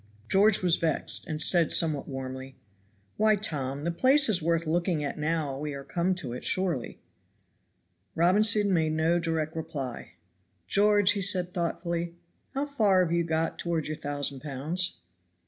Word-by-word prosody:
George 195 Hz, -, +3 dB
was 175 Hz, -2 st, +4 dB
vexed, 160 Hz, +2 st, -2 dB
and 155 Hz, -2 st, -4 dB
said 170 Hz, +1 st, +2 dB
somewhat 155 Hz, -4 st, +1 dB
warmly, 130 Hz, -1 st, -6 dB, 0.6 s
"Why, 215 Hz, 0 st, +4 dB
Tom, 145 Hz, -8 st, -3 dB
the 170 Hz, -, 0 dB
place 265 Hz, -, +4 dB
is 185 Hz, -5 st, +2 dB
worth 165 Hz, +1 st, 0 dB
looking 170 Hz, -1 st, 0 dB
at 145 Hz, -, -4 dB
now 150 Hz, -3 st, -1 dB
we 150 Hz, -1 st, -4 dB
are 140 Hz, -, -7 dB
come 180 Hz, +4 st, -1 dB
to 135 Hz, -10 st, -5 dB
it, 125 Hz, -, -7 dB
surely." 175 Hz, -10 st, -1 dB, 1.2 s
Robinson 205 Hz, +3 st, +3 dB
made 160 Hz, -2 st, +1 dB
no 160 Hz, +2 st, +2 dB
direct 160 Hz, -2 st, -2 dB
reply. 140 Hz, -6 st, -6 dB, 0.5 s
"George," 205 Hz, -, +4 dB
said 180 Hz, -1 st, +4 dB
he 180 Hz, -, -22 dB
thoughtfully, 170 Hz, 0 st, -3 dB, 0.4 s
"how 275 Hz, +2 st, 0 dB
far 210 Hz, -10 st, +3 dB
have 170 Hz, -1 st, -1 dB
you 170 Hz, 0 st, +2 dB
got 165 Hz, 0 st, -1 dB
toward 170 Hz, -3 st, -1 dB
your 155 Hz, -, -3 dB
thousand 145 Hz, -2 st, -4 dB
pounds?" 155 Hz, +6 st, -2 dB
165 Hz, 155 wpm, -28 LUFS, 150-185 Hz, 1.2 s, was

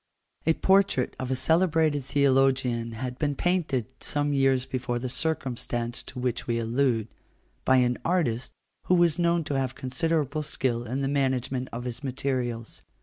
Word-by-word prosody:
A 160 Hz, -, +6 dB
portrait 190 Hz, -9 st, +2 dB
of 130 Hz, -, -3 dB
a 130 Hz, -, +1 dB
celebrated 160 Hz, 0 st, +2 dB
theologian 130 Hz, -4 st, +2 dB
had 125 Hz, +2 st, -5 dB
been 145 Hz, -2 st, 0 dB
painted 165 Hz, -8 st, 0 dB
some 145 Hz, -1 st, -1 dB
years 135 Hz, -2 st, +3 dB
before 125 Hz, -2 st, -2 dB
the 125 Hz, +2 st, -3 dB
circumstance 125 Hz, -5 st, -2 dB
to -, -, -11 dB
which 125 Hz, -1 st, -2 dB
we 115 Hz, -1 st, 0 dB
allude, 115 Hz, -1 st, +1 dB, 0.6 s
by 130 Hz, -, +5 dB
an 125 Hz, -1 st, +2 dB
artist 150 Hz, -9 st, 0 dB, 0.3 s
who 180 Hz, -, +4 dB
was 170 Hz, -1 st, +3 dB
known 170 Hz, -1 st, +2 dB
to 140 Hz, -2 st, -1 dB
have 130 Hz, -1 st, -2 dB
considerable 150 Hz, +3 st, -1 dB
skill 125 Hz, -5 st, -1 dB
in 130 Hz, +4 st, -2 dB
the 135 Hz, -, 0 dB
management 130 Hz, -2 st, 0 dB
of 120 Hz, +1 st, -5 dB
his 125 Hz, +2 st, -6 dB
materials. 125 Hz, -3 st, -3 dB
130 Hz, 155 wpm, -27 LUFS, 125-150 Hz, 0.6 s, A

